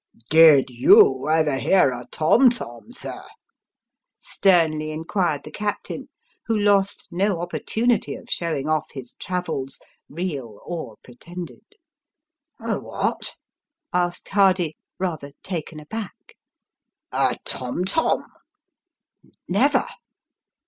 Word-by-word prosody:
" 115 - -27
Did 155 -5 +7
you 130 +3 +5
ever 155 -3 +2
hear 180 -6 +4
a 125 -1 -7
tom 235 +12 +5
tom, 120 - -7
sir? - - -7 0.6
" - - -64 0.2
sternly 160 -5 +3
inquired 165 0 -1
the 150 - -10
captain, 205 +4 -4 0.4
who 225 -1 +1
lost 200 -1 +2
no 190 0 0
opportunity 220 +6 -1
of - - -12
showing 155 -5 -2
off 155 -1 0
his 130 -4 -9
travels, 165 -7 -3 0.3
real 140 - -5
or 160 -11 -6
pretended. 175 - -10 0.5
" 310 0 -56
A - - -2
what? - - -3 0.3
" - - -67 0.2
asked 175 -1 -1
Hardy, 185 -5 +3 0.2
rather 160 -6 -4
taken 165 -4 -5
aback. 205 +7 -8 0.4
" - - -62 0.2
A - - -5
tom 130 +8 -3
tom." 320 +12 +1 0.6
" - - -33
Never - - +3
165 Hz, 120 wpm, -23 LUFS, 145-195 Hz, 0.6 s, Did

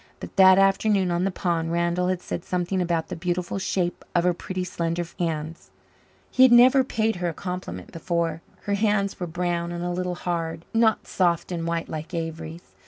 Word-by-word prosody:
But - - -9
that 190 -1 +8
afternoon 195 -1 +3
on 175 +2 +1
the - - +2
pond 170 -3 -1
Randall 170 +1 +1
had 185 -1 -1
said 175 - -4
something 180 +1 -1
about 170 -2 -1
the - - -4
beautiful 175 +2 -2
shape 190 -2 -1
of 175 - +3
her 180 0 +3
pretty 185 +1 -4
slender 170 -1 -2
hands. 160 - -3 0.6
He 255 - +2
had 260 -1 +8
never 255 +2 +7
paid 225 -4 0
her 175 -1 -1
a 165 - -6
compliment 180 - -6
before. 165 -1 -2 0.2
Her 205 - -2
hands 200 -1 +1
were 180 - -3
brown 170 0 -2
and 175 0 -4
a 175 - -2
little 180 0 -2
hard 165 -2 -3
not 225 -1 +3
soft 175 -2 0
and 170 -1 -3
white 170 0 -2
like 160 +2 -6
Avery's. 165 0 -5
175 Hz, 190 wpm, -25 LUFS, 170-190 Hz, 0.6 s, that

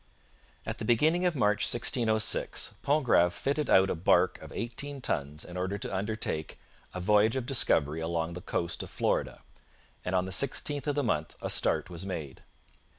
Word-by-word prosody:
At - - -5
the - - -4
beginning 155 +9 +2
of 175 -2 +1
March 105 -5 +2
1606 110 -2 +1
Pontgrave 125 - +3
fitted 145 +2 -2
out 95 0 +5
a - - +1
barque 90 +2 +2
of - - -11
eighteen 135 +4 -4
tons 75 - -3
in 90 - -10
order 95 +2 -2
to 100 - -4
undertake 100 -6 -3 0.4
'a - - -3
voyage 105 +4 +3
of 130 -2 -2
discovery 80 - +2
along 80 0 -2
the 90 - -7
coast 85 -3 -2
of - - -8
Florida'; - - -1 0.6
and 90 - -2
on 90 0 +2
the 95 - -6
16th 145 - 0
of 145 - 0
the 145 - 0
month 80 - -1
a - - -2
start 95 - +1
was 85 +1 -5
made. 80 -8 -6
100 Hz, 175 wpm, -29 LUFS, 85-130 Hz, 0.6 s, out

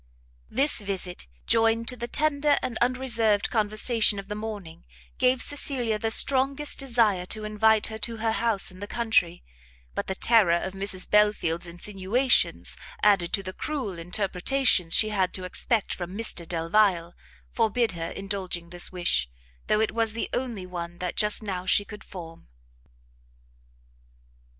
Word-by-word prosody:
This 275 +3 +1
visit, 190 - -5 0.2
joined 225 0 +2
to 250 - -2
the 240 0 -5
tender 295 +1 +1
and 245 - -3
unreserved 235 -4 +2
conversation 215 0 +3
of 195 0 -7
the - - -2
morning, 205 -6 -7 0.4
gave 255 0 +2
Cecilia 250 -6 0
the 225 - -1
strongest 275 +5 +2
desire 230 -9 +1
to 215 +2 -4
invite 215 0 +2
her 220 0 -6
to 230 +1 -2
her 225 0 0
house 225 -4 +1
in 185 - -14
the 205 - -6
country; 215 -8 +1 0.5
but - - -3
the 190 - -2
terror 210 -6 +4
of 190 +2 -3
Mrs 195 -1 -1
Belfield's 210 -5 +2
insinuations, 195 +8 0 0.3
added 190 -5 +4
to 195 - +1
the 185 0 -6
cruel 250 - -4
interpretations 185 +2 +1
she 215 - +4
had 190 -3 0
to 185 - -5
expect 215 +4 -1
from 180 +2 -6
Mr 180 -7 -1
Delvile, 170 +1 +1 0.4
forbid 230 +1 +1
her 165 -2 -5
indulging 190 -4 -5
this 175 0 -2
wish, 175 - 0 0.4
though 215 - +2
it 220 - +1
was 225 -1 +1
the 230 - -4
only 235 -7 -3
one 175 -1 -7
that 180 -1 -4
just 210 +1 +2
now 185 -3 -4
she 205 - +4
could 210 +1 -11
form. 165 -4 -11
210 Hz, 150 wpm, -26 LUFS, 180-230 Hz, 0.5 s, terror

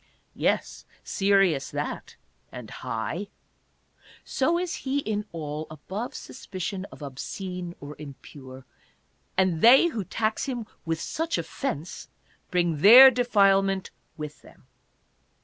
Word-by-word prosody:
Yes, - - -1 0.2
serious 195 -8 +2
that, - - -5 0.4
and 125 -4 -9
high. 115 - -4 1.0
So 325 +6 +1
is 355 -1 -2
he 270 +1 -2
in 215 -6 -2
all, 155 -1 -5
above 190 - -6
sus - - -10
picion 185 +1 -4
of - - -11
obscene 175 +6 -6
or 145 +1 -9
impure; 130 -2 -11 0.7
and 185 -4 +2
they 265 +9 +7
who 225 -10 -3
tax 215 +4 -1
him 245 -4 -4 0.2
with 165 -1 -1
such 325 - -2
offense 165 - -5 0.4
bring 175 -4 0
their 255 +7 +11
defilement 195 -6 +2 0.3
with 150 -1 -7
them. - - -19
190 Hz, 115 wpm, -26 LUFS, 150-225 Hz, 1.0 s, their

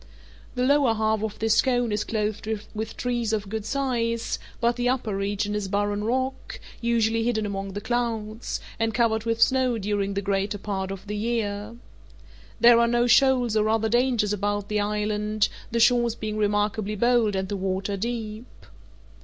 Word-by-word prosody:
The 250 - 0
lower 270 -3 +3
half 220 -1 +1
of 215 -1 -3
this 220 0 +3
cone 245 -3 +1
is 210 0 0
clothed 215 -1 -2 0.3
with 220 +1 -5
trees 240 -3 -1
of 210 -2 -2
good 220 0 -4
size, 235 -4 -1 0.2
but 235 0 +2
the 245 0 0
upper 235 -5 -1
region 205 +1 -1
is 210 -2 -2
barren 205 +1 -1
rock, 260 +4 -2 0.2
usually 230 -1 +1
hidden 220 -2 0
among 195 -1 -4
the 205 - -4
clouds, 225 -1 -2 0.2
and 225 -1 0
covered 225 -2 +1
with 230 0 0
snow 255 -1 +3
during 200 -1 -1
the 200 - 0
greater 200 +1 -1
part 190 -2 -3
of 195 0 -7
the 210 +1 -4
year. 210 -1 -2 0.8
There 235 0 +7
are 235 - +4
no 240 +1 +2
shoals 250 -2 +4
or 215 0 +2
other 220 0 +1
dangers 240 -3 +2
about 205 0 -2
the 210 0 0
island, 210 0 0 0.2
the 235 - -1
shores 235 0 +4
being 215 -2 -4
remarkably 210 0 0
bold 235 -1 +2
and 190 0 -1
the 205 - -3
water 195 +1 -2
deep. 225 +2 -5
220 Hz, 170 wpm, -25 LUFS, 205-235 Hz, 0.8 s, There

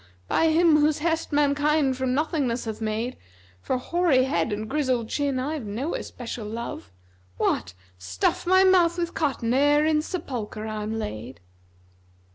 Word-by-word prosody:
by 325 - +2
Him, 320 -1 +5
whose 300 0 +3
hest 325 +1 -1
mankind 290 -1 +2
from 260 0 -1
nothingness 280 -6 -1
hath 220 0 -5
made 220 +3 -2 0.4
For 255 - -1
hoary 315 -1 +2
head 265 -4 0
and 215 +1 -3
grizzled 255 -4 0
chin 285 -2 -1
I've 280 -3 -3
no 245 +11 -3
especial 230 -3 -6
love: 225 - -6 0.2
* 90 0 -34
What! 90 -1 -1 0.2
stuff 90 - -1
my 375 +1 +6
mouth 360 -2 +4
with 345 -1 -2
cotton[FN#265] 265 -6 -1
ere 290 +3 +4
in 310 -1 +2
sepulchre 245 - -5
I'm 215 0 -3
laid?'" 115 - -6
265 Hz, 150 wpm, -25 LUFS, 220-305 Hz, 0.4 s, my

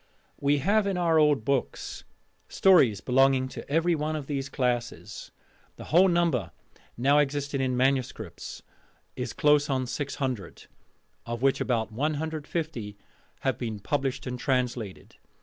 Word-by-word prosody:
We 145 +1 +2
have 200 +8 +2
in 195 -2 -1
our 165 -2 +3
old 150 -7 +3
books 140 -2 -2 0.4
stories 150 - +4
belonging 130 0 +3
to - - -9
every 165 +4 +2
one 155 0 -1
of 150 -3 -4
these 135 -1 -3
classes. 125 -3 -3 0.5
The - - -10
whole 185 +3 +7
number 170 - +1 0.5
now 140 +5 +4
existing 140 -1 -1
in 130 -1 0
manuscripts 130 -1 -2 0.5
is - - -4
close 150 -1 +3
on 130 -2 0
600: 130 - -4 0.6
of 120 +1 -4
which 135 -1 +3
about 115 -3 0
150 150 -4 -3 0.4
have - - -1
been 110 -3 -4
published 135 +4 -2
and 125 -1 -4
translated. 125 -6 -2
135 Hz, 130 wpm, -27 LUFS, 125-150 Hz, 0.6 s, whole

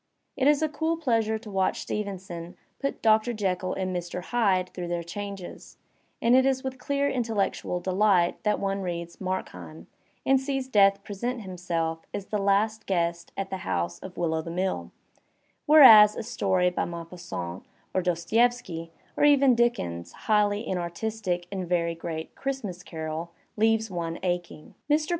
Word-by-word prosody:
It 265 - +2
is 295 +1 +4
a - - +3
cool 320 +2 -1
pleasure 225 -7 +1
to 215 -1 -11
watch 190 -1 0
Stevenson 185 -4 -5 0.2
put 275 - -3
Doctor 220 +2 +4
Jekyll 185 -3 -1
and 185 -1 -2
Mr. 175 0 -4
Hyde 190 -5 +1
through 180 -1 -5
their 170 0 -2
changes, 195 +1 -8 0.4
and 235 +2 +4
it 260 - +6
is 265 -1 +1
with 260 -1 -5
dear 280 0 +1
intellectual 220 -8 -1
delight 185 -1 +2
that 210 -1 +1
one 195 0 -1
reads 170 -2 -5
^^Markheim" 90 - -5 0.4
and 270 0 +4
sees 270 -1 -2
Death 200 -4 +4
present 240 +4 -4
himself 170 -4 -3 0.2
as 200 - -4
the 210 - -1
last 205 +2 +1
guest 170 -2 -1
at 195 -1 -3
the 190 - -2
house 85 - -2
of 180 - -10
"Will 170 -2 0
o' 160 - 0
the 165 - -8
Mill"; 185 +3 -2 0.8
whereas 225 -9 +9
a - - -4
story 190 -6 +1
by - - -1
Maupassant 170 - -6 0.3
or 185 - +2
Dostolevski, 180 0 0 0.3
or - - 0
even 280 -3 +6
Dickens's 85 - 0
highly 210 0 +2
inartistic 180 +1 -2
and 185 -3 -4
very 170 -1 +1
great 165 -1 -6
"Christmas 245 -10 -4
Carol," 160 0 -5 0.2
leaves 220 0 +2
one 170 -2 -3
aching. 175 -4 -3 0.2
Mr. 305 +1 +2
190 Hz, 155 wpm, -27 LUFS, 175-225 Hz, 0.8 s, whereas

